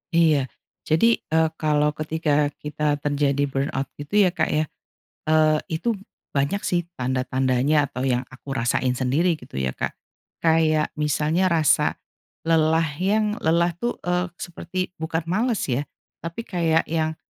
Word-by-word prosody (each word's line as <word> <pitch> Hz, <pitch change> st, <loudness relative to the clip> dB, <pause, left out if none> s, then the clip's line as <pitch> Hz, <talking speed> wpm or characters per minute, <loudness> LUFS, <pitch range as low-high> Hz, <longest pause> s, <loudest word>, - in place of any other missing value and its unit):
Iya. 155 Hz, -5 st, +4 dB, 0.4 s
Jadi, 225 Hz, +9 st, +4 dB
eee, 160 Hz, 0 st, +1 dB
kalau 150 Hz, -1 st, +2 dB
ketika 150 Hz, -1 st, 0 dB
kita 150 Hz, 0 st, -1 dB
terjadi 145 Hz, -1 st, +1 dB
burnout 135 Hz, 0 st, -2 dB
gitu 200 Hz, +8 st, +2 dB
ya 180 Hz, -, +3 dB
Kak -, -, 0 dB
ya, 155 Hz, -, +1 dB, 0.6 s
eee, 155 Hz, 0 st, +4 dB
itu 215 Hz, +7 st, 0 dB, 0.4 s
banyak 140 Hz, +9 st, +1 dB
sih 175 Hz, -3 st, 0 dB, 0.2 s
tanda-tandanya 130 Hz, +3 st, +1 dB
atau 130 Hz, +1 st, -4 dB
yang 125 Hz, -2 st, +2 dB
aku 135 Hz, +1 st, -9 dB
rasain 125 Hz, 0 st, +1 dB
sendiri 135 Hz, +8 st, +1 dB
gitu -, -, -11 dB
ya 65 Hz, -1 st, -1 dB
Kak, -, -, -4 dB, 0.5 s
kayak 160 Hz, -1 st, +3 dB
misalnya 155 Hz, +5 st, +2 dB
rasa 160 Hz, -5 st, +3 dB, 0.5 s
lelah 160 Hz, 0 st, +3 dB, 0.2 s
yang 210 Hz, +3 st, +1 dB
lelah 170 Hz, +2 st, +2 dB
tuh, 240 Hz, -, -1 dB
eee, 180 Hz, 0 st, 0 dB
seperti 185 Hz, +1 st, -5 dB
bukan 160 Hz, 0 st, -2 dB
males 215 Hz, +6 st, 0 dB
ya, 130 Hz, 0 st, 0 dB, 0.4 s
tapi 170 Hz, +7 st, -6 dB
kayak 165 Hz, -5 st, +1 dB
yang, 160 Hz, -1 st, -1 dB
155 Hz, 140 wpm, -23 LUFS, 145-170 Hz, 0.6 s, Iya